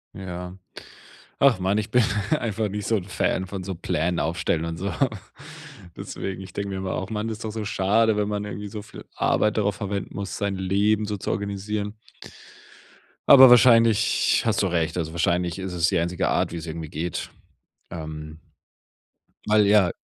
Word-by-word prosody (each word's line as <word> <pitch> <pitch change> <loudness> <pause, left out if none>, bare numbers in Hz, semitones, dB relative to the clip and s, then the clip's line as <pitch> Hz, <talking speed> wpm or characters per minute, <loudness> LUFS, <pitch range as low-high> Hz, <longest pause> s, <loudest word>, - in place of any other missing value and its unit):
Ja. 90 -1 -7 0.8
Ach, 135 -7 +5
Mann, 95 +3 +1
ich 110 - -3
bin 125 - +4 0.4
einfach 110 -5 -2
nicht 105 0 -5
so 115 - +2
'n 95 - -3
Fan 95 0 -1
von 95 0 -6
so 95 0 -4
Plänen 85 +1 -1
aufstellen 80 -1 -1
und 85 0 -4
so. 95 +4 -3 1.0
Deswegen, 95 -1 -6
ich 95 -1 -11
denke 100 +1 -4
mir 95 - -4
immer 95 -1 -3
auch: 95 - -4
„Mann, 110 +1 -2
ist 110 0 -6
doch 110 - -3
so 110 0 -4
schade, 105 +2 +2
wenn 105 -1 0
man 105 0 -2
irgendwie 105 0 -6
so 105 +1 -7
viel 105 - -12
Arbeit 105 - +1
darauf 105 -2 0
verwenden 100 -1 -4
muss, 100 -4 -5
sein 100 -1 -1
Leben 100 +3 +1
so 105 0 -3
zu 95 - -5
organisieren.” 100 +1 -3 1.3
Aber 130 -2 +10
wahrscheinlich 115 -2 +5
hast 110 -1 +1
du - - +2
recht. 85 -1 -1
Also 80 -2 -2
wahrscheinlich 85 0 0
ist 95 -1 -4
es 85 -2 +2
die - - +1
einzige 85 +1 -1
Art, - - +1
wie 85 - -5
es 80 - -6
irgendwie 80 -1 -6
geht. 85 +4 -4 0.6
Ähm, 75 -1 -7 1.1
weil 105 -1 +4
ja 100 -4 +4
100 Hz, 180 wpm, -24 LUFS, 90-105 Hz, 1.3 s, Aber